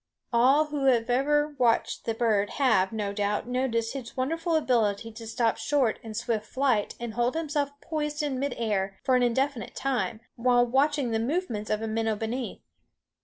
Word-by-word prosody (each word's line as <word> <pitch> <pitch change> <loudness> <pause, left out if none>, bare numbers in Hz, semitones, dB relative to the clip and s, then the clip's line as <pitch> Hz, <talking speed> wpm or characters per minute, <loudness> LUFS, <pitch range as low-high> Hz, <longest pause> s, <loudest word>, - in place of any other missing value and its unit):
All 265 +6 +5
who 295 -2 -3
have 245 -2 +3
ever 295 +4 +2
watched 235 -2 +1
the 225 - -1
bird 215 -3 +1
have, 220 -9 +3
no 210 -3 -3
doubt, 205 +2 -1
noticed 245 -2 -1
his 265 -2 -7
wonderful 330 +6 0
ability 225 -7 +1
to 225 0 -9
stop 225 0 +1
short 245 0 +1
in 220 -1 -8
swift 215 -1 -2
flight 260 -6 0
and 235 -2 -5
hold 240 +4 0
himself 290 -3 -2
poised 300 -1 -2
in 275 -3 -1
midair 215 -8 -1
for 260 -2 +3
an 250 - +3
indefinite 250 +1 0
time, 240 -6 -1
while 245 0 +3
watching 270 +1 +1
the 225 - +1
movements 235 - -2
of 215 +1 -1
a - - -2
minnow 220 0 0
beneath. 230 +4 -4
245 Hz, 170 wpm, -27 LUFS, 225-275 Hz, -, All